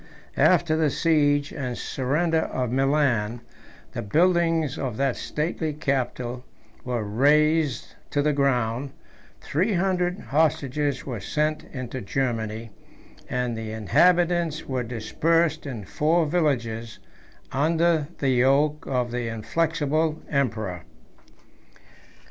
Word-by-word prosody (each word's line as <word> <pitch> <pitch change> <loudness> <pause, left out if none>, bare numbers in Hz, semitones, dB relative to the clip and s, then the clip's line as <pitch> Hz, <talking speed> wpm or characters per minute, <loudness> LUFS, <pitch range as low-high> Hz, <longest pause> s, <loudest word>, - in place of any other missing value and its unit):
after 170 -3 +4
the 160 -1 +2
siege 145 -2 +2
and 125 -3 -4
surrender 155 +5 0
of 125 -6 -2
Milan, 130 -5 +1 0.5
the - - -4
buildings 165 - +2
of 125 -8 -4
that 135 -2 +1
stately 155 0 -2
capital 125 -4 -2 0.4
were 120 -3 -2
razed 145 +5 +2 0.2
to 145 - 0
the 150 0 +2
ground, 130 -2 0 0.5
three 185 +9 0
hundred 180 0 0
hostages 145 -2 0
were 125 -5 -4
sent 150 +9 -1
into 130 -1 -6
Germany, 115 -1 -2 0.6
and 125 -2 -1
the 110 -1 -5
inhabitants 170 - +2
were 130 -2 -1
dispersed 155 +8 0
in 115 -7 -6
four 160 - +1
villages, 120 -9 -1 0.5
under 160 +1 +2
the 135 - 0
yoke 140 +4 +2
of 125 -2 -1
the 120 -1 -2
inflexible 155 +6 0
conqueror. 110 - -1
140 Hz, 110 wpm, -25 LUFS, 120-160 Hz, 0.6 s, after